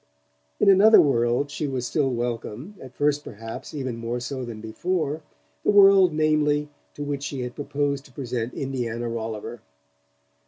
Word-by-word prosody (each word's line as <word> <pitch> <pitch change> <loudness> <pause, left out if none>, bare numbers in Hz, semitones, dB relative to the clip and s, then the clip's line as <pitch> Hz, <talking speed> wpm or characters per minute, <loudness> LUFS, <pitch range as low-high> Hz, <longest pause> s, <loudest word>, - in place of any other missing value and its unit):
In - - +3
another 200 +3 +8
world 125 0 +2
she 150 0 -3
was 130 -3 -3
still 140 +1 +1
welcome, 120 - -4
at 130 -1 -11
first 145 0 +1
perhaps 115 +1 -8
even 130 -5 -4
more 115 +1 -3
so 130 +2 -4
than 115 -3 -7
before: 155 +7 -2 0.4
the - - +1
world, 195 -3 +7
namely, 150 -1 +1 0.3
to 145 - -5
which 145 -1 -3
she 140 -2 -4
had 125 0 -4
proposed 140 -1 -2
to - - -17
present 125 -2 -4
Indiana 120 -3 -3
Rolliver. 115 0 -5
135 Hz, 155 wpm, -24 LUFS, 120-150 Hz, 0.4 s, another